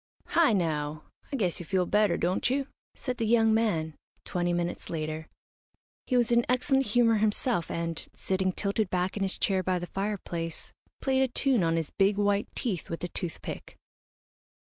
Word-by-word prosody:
"Hi 335 -5 +4
now 155 -5 -1 0.3
I - - -1
guess 185 -9 0
you 175 - -6
feel 185 -2 +2
better, 210 +2 +3
don't 180 +6 +1
you?" 275 +2 0 0.3
said 250 -2 -4
the 225 - 0
young 225 -1 +4
man, 170 -9 +1 0.3
twenty 175 -1 0
minutes 175 0 -2
later. 155 -1 -4 0.8
He 255 - +2
was 240 -1 +3
in 235 0 +5
excellent 265 +1 +2
humour 230 +1 +4
himself, 210 -2 +1
and, 165 -1 -3
sitting 190 0 0
tilted 200 +1 -1
back 180 +1 0
in 205 - -3
his 195 -1 -1
chair 190 -2 +1
by 185 0 0
the 175 - -4
fireplace, 175 -4 -4 0.3
played 265 -1 +2
a 265 - +4
tune 255 -2 +2
on 165 -1 +2
his 165 -2 -2
big 195 +1 +2
white 205 0 +2
teeth 200 -9 -2
with 165 - -5
a 175 - -2
toothpick. 170 -1 -6
195 Hz, 175 wpm, -28 LUFS, 170-230 Hz, 0.8 s, in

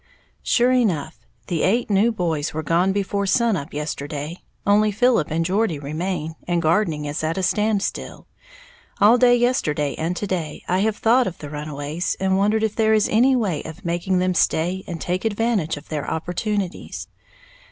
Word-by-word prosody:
_ - - -39 0.4
Sure 245 +1 +3
enough, 180 - 0 0.2
the 170 -4 -2
eight 230 +6 +2
new 205 +4 +4
boys 165 -8 -2
were 160 - -2
gone 170 +5 +2
before 200 0 -1
sun 230 +2 +3
up 150 -3 -5
yesterday, 150 +2 -5 0.2
only 210 +1 +4
Philip 230 -6 +2
and 165 +2 0
Geordie 190 -2 +1
remain, 160 +3 -3
and 175 -1 +1
gardening 160 -2 +1
is 145 +2 -3
at 160 +2 -1
a 190 - -1
standstill. 210 +1 -1 0.7
All 225 +4 +6
day 245 0 +6
yesterday 155 - +1
and 170 +3 -1
to - - -2
day 170 -6 -4
I 180 +1 +1
have 210 +1 +1
thought 240 +2 +3
of 175 - -5
the 145 -1 -9
runaways, 150 +3 -3
and 190 0 +1
wondered 210 +3 +2
if 220 -1 0
there 220 -1 +3
is 215 - +2
any 255 +5 +4
way 195 - 0
of 160 +5 -10
making 175 +2 0
them 185 0 +1
stay 180 +2 +1
and 170 -2 -5
take 180 +3 -2
advantage 220 -7 0
of 145 - -12
their 150 -3 -3
opportunities. 185 +3 -3
185 Hz, 180 wpm, -22 LUFS, 160-215 Hz, 0.7 s, All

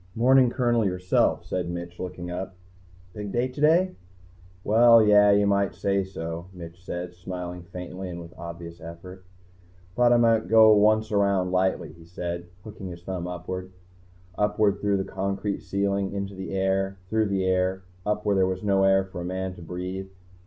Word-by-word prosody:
"Morning, 125 +2 +5
Colonel, 120 -2 +1
yourself," 90 -2 +1
said 90 -2 -3
Mitch, 85 0 -6
looking 90 -1 -6
up. 95 +1 -5 0.6
"Big 105 0 -6
date 125 +2 -1
today?" 165 +6 +3 0.7
"Well 115 +2 +6
yeah, 105 -1 +6
you 100 0 +4
might 100 0 +1
say 100 0 0
so," 85 -2 -6
Mitch 85 0 -11
said, 90 -1 -5
smiling 90 0 -6
faintly 90 +1 -7
and 85 -1 -6
with 85 -1 -11
obvious 85 0 -9
effort. 90 +3 -10 0.7
"Thought 120 0 +4
I 120 - +6
might 115 -3 +3
go 110 +1 +7
once 110 +1 +3
around 100 -3 +2
lightly," 95 -3 0
he 85 +1 -16
said, 85 0 -5 0.2
hooking 105 -3 -8
his 85 -1 -9
thumb 90 -1 -4
upwards. 90 +1 -6 0.6
Upwards 105 -1 +2
through 100 -1 +1
the 95 - -1
concrete 100 +1 -3
ceiling, 100 0 -1
into 100 0 -4
the 95 0 -7
air, 95 0 0
through 110 -1 +2
the 95 -1 0
air, 95 0 0 0.2
up 105 +1 -2
where 100 - +2
there 95 -1 +3
was 95 +1 -3
no 100 -1 +2
air 95 0 +4
for 95 -2 -8
a - - -4
man 95 +1 -3
to 90 - -13
breathe. 90 +3 -5
95 Hz, 175 wpm, -25 LUFS, 90-105 Hz, 0.7 s, go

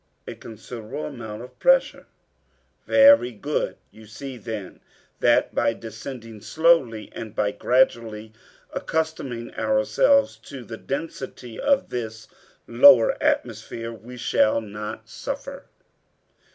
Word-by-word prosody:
"A - - -6
considerable 115 +4 -8
amount 115 -5 -7
of 125 - -14
pressure." - - +3 0.8
"Very 275 - +6
good. 145 +7 -3
You 110 0 -15
see, 130 +5 -8
then, 110 -4 -7 0.4
that - - +3
by 115 - +1
descending 115 0 -9
slowly, 155 -9 +2
and 110 -1 -8
by 105 -1 +1
gradually 115 -4 0 0.4
accustoming 150 -7 -3
ourselves 270 +1 +2
to 135 -3 -10
the 115 - -8
density 130 -5 -6
of 280 -1 +2
this 110 -3 -5 0.4
lower 120 0 +7
atmosphere, 115 0 -2
we 120 +2 -11
shall 115 -2 +2
not 105 0 -7
suffer." - - -6
120 Hz, 110 wpm, -24 LUFS, 110-140 Hz, 0.8 s, lower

